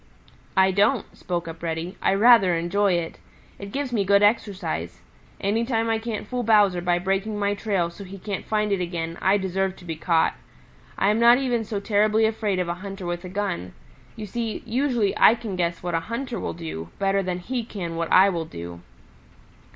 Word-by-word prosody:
"I 190 0 +5
don't," 205 +5 +1
spoke 175 -2 -4
up 165 0 -8
Reddy. 165 +2 -3
"I 195 - +2
rather 205 -4 +6
enjoy 185 +4 +1
it. 170 -1 -3 0.4
It 200 0 -8
gives 275 -1 -3
me 210 -4 +2
good 200 +1 +4
exercise. 190 - 0 0.4
Any 210 +4 0
time 230 -2 0
I 225 - +1
can't 220 -2 -5
fool 250 +1 -2
Bowser 205 -6 +4
by 175 0 +1
breaking 195 +4 -1
my 200 0 +1
trail 195 -5 -1
so 200 - -10
he 195 +1 -9
can't 195 +1 -5
find 210 -1 0
it 195 -2 +1
again, 170 -1 -4
I 190 +2 +4
deserve 190 0 -1
to 180 - -15
be 165 -2 -4
caught. 160 +1 +2 0.6
I 195 - +2
am 215 - +1
not 235 +1 +7
even 245 -4 0
so 210 -1 -3
terribly 215 +1 +2
afraid 215 -3 0
of 180 -1 -1
a 170 - -1
hunter 195 -2 -7
with 175 +1 -3
a - - -6
gun. 185 - -3 0.4
You 215 - -6
see, 225 +1 -4
usually 240 -3 0
I 225 - +7
can 220 -5 -6
guess 170 -1 -2
what 175 -1 -3
a 165 - +2
hunter 235 +7 -4
will - - -3
do 160 - -6
better 195 0 +1
than 180 -1 -2
he 240 +7 -3
can 180 -7 -6
what 165 0 -3
I 190 +2 +7
will 170 -4 -2
do." 85 - -8
195 Hz, 205 wpm, -24 LUFS, 175-220 Hz, 0.6 s, not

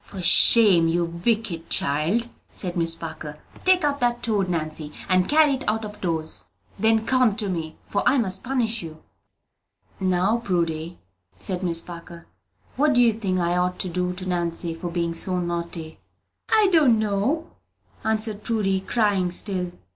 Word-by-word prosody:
"For 195 - -10
shame, 185 -1 +7
you 170 +1 +1
wicked 170 0 -2
child," 160 +12 +1 0.2
said 180 -3 -4
Miss 165 -1 +2
Parker. 155 -2 -7 0.3
"Take 370 -3 +4
up 285 -1 0
that 240 -1 0
toad, 205 -5 0
Nancy, 155 -3 -4 0.2
and 185 -1 +2
carry 300 -1 +5
it 265 0 -3
out 220 0 0
of 210 0 -10
doors; 160 -3 -3 0.3
then 220 +1 +2
come 255 -5 +2
to 210 -2 -1
me, 160 -3 -4
for 200 - -1
I 275 - +2
must 190 -6 0
punish 235 -3 -1
you." 160 -2 -10 1.0
"Now, 190 +4 +1
Prudy," 170 -5 -2 0.4
added 185 -2 -4
Miss 170 -3 +1
Parker, 170 -1 -11 0.5
"what 295 +2 +3
do 245 - +5
you 230 -2 +4
think 200 -4 -2
I 175 0 0
ought 180 0 0
to 185 - -3
do 180 +1 -2
to 185 +1 -8
Nancy 170 -2 -2
for 170 +2 -6
being 170 -1 -2
so 180 +2 -1
naughty?" 170 -2 -5 0.5
"I 430 -3 +4
don't 290 -9 +5
know," 220 +10 -1 0.5
answered 220 -1 -1
Prudy, 210 -4 0
crying 195 -2 0
still. 180 0 -1
185 Hz, 160 wpm, -23 LUFS, 170-225 Hz, 1.0 s, shame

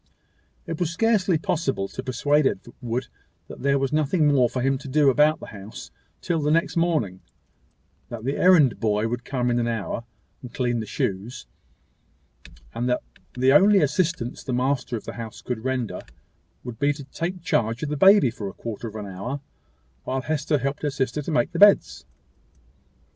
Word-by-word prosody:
It 165 - -5
was 175 -3 0
scarcely 195 -1 +2
possible 155 - -1
to - - -6
persuade 145 +3 +2
Edward 120 +3 -4 0.4
that - - -10
there 140 +1 +2
was 135 +1 -1
nothing 155 +2 +2
more 125 -3 +4
for 125 - -3
him 135 0 +1
to - - -10
do 140 0 +4
about 150 +4 +3
the - - -8
house 100 +1 -10 0.3
till 170 -2 -1
the 150 - 0
next 165 +2 +1
morning; 155 - 0 0.9
that 115 -2 -7
the 135 +3 -1
errand 165 -9 +5
boy 105 -1 +1
would 120 +1 -4
come 125 -2 -1
in 120 - +1
an 120 - 0
hour, 115 0 -3 0.4
and 125 - -9
clean 120 -2 0
the 110 - -5
shoes; 100 - -3 1.3
and 125 +1 -2
that 125 - 0 0.3
the 130 +2 +3
only 200 +6 +6
assistance 150 -5 -1
the 130 - -3
master 125 -1 0
of - - -9
the - - -7
house 110 -2 -8
could 120 -3 -4
render, 130 -3 -2 0.6
would 120 -2 -8
be 145 +1 +2
to 145 0 -9
take 170 +6 -5
charge 115 -2 0
of 150 - -2
the 150 - -1
baby 190 - +6
for 105 -3 -6
a - - -10
quarter 115 0 -6
of 110 - -9
an 105 -1 -5
hour, 100 +9 -5 0.6
while 130 +1 -2
Hester 150 +2 0
helped 140 +1 -3
her 150 - 0
sister 135 +2 -2
to 145 - -6
make 155 +2 +1
the 170 - -4
beds. 205 0 +5
135 Hz, 185 wpm, -24 LUFS, 120-155 Hz, 1.3 s, only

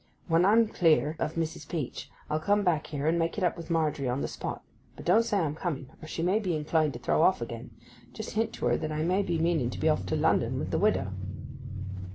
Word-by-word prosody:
When 165 +1 +4
I'm 220 +3 +5
clear 160 -5 +3
of 155 - -2
Mrs. 160 -2 -3
Peach 155 -7 -4 0.2
I'll 155 - 0
come 205 +5 +2
back 170 -5 +1
here 145 -1 -3
and 165 +2 +2
make 165 +3 0
it 200 - -1
up 180 - +2
with 170 -2 -9
Margery 155 -5 +1
on 125 +3 -1
the - - -1
spot. - - -5 0.3
But - - -10
don't 190 +6 +5
say 230 -3 0
I'm 160 -6 0
coming, 150 -5 -4
or 155 - -8
she 165 - -3
may 190 +5 +3
be 185 -6 -1
inclined 155 -1 +1
to 120 - -7
throw 125 - +1
off 185 +3 +4
again. 120 +1 -6 0.4
Just 220 - -6
hint 225 +1 0
to - - -4
her 120 0 +3
that 155 - -3
I 155 0 -1
may 185 +4 +2
be 175 -4 -1
meaning 160 -6 +1
to - - -6
be 160 - +3
off 125 -12 +1
to - - 0
London - - +2
with - - -3
the - - +1
widow. 95 +1 +2
160 Hz, 245 wpm, -29 LUFS, 150-180 Hz, 0.4 s, I'm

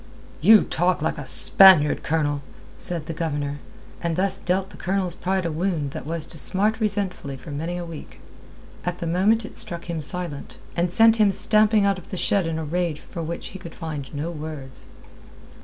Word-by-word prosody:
"You 215 +6 +7
talk 175 -1 0
like 160 - -1
a 140 - -7
Spaniard, 175 0 +6
Colonel," 145 -2 -1 0.3
said 170 -4 -4
the 165 - -5
Governor, 145 -3 -3 0.4
and 170 -2 -1
thus 195 +2 0
dealt 185 +2 -1
the - - -13
Colonel's 185 -1 -1
pride 185 +1 -2
a 165 - -1
wound 160 -3 -2
that - - -7
was 165 -1 -1
to 160 - +1
smart 210 - +2
resentfully 195 - -1
for 135 +4 -10
many 165 +5 -4
a 175 - -5
week. 165 -3 -10 0.6
At 180 0 -3
the 170 - -5
moment 200 +7 +2
it - - -7
struck 170 0 -4
him 165 -2 -3
silent, 155 -1 -3 0.2
and 175 0 0
sent 225 +3 +5
him 210 -2 +4
stamping 215 +1 +4
out 200 -1 +1
of 175 - -17
the 190 - -5
shed 190 -1 +1
in 165 -1 -2
a 160 - -4
rage 170 -1 -2
for 170 - -8
which 165 +1 -5
he 190 - -10
could 170 -2 -10
find 155 -5 -6
no 150 +3 -4
words. 150 -4 -8
170 Hz, 195 wpm, -23 LUFS, 155-190 Hz, 0.6 s, You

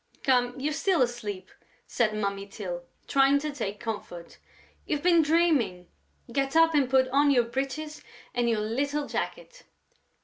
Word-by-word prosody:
"Come, 250 -1 +2
you're 300 +3 -1
still 345 -1 +2
asleep!" 210 -7 -5 0.3
said 215 -3 0
Mummy 200 -1 -2
Tyl, 180 -4 -6 0.3
trying 275 0 +4
to 300 +1 -3
take 205 -8 -4
comfort. 205 -7 -7 0.5
"You've 295 -2 -2
been 345 -2 +5
dreaming!... 295 - +1 0.4
Get 275 +3 -1
up 325 0 +5
and 280 -4 +2
put 260 -1 +4
on 285 +2 +3
your 250 -4 +4
breeches 275 +5 -4 0.3
and 240 -1 +1
your 220 -2 +1
little 280 +7 -1
jacket...." - - -5
265 Hz, 145 wpm, -27 LUFS, 215-295 Hz, 0.5 s, been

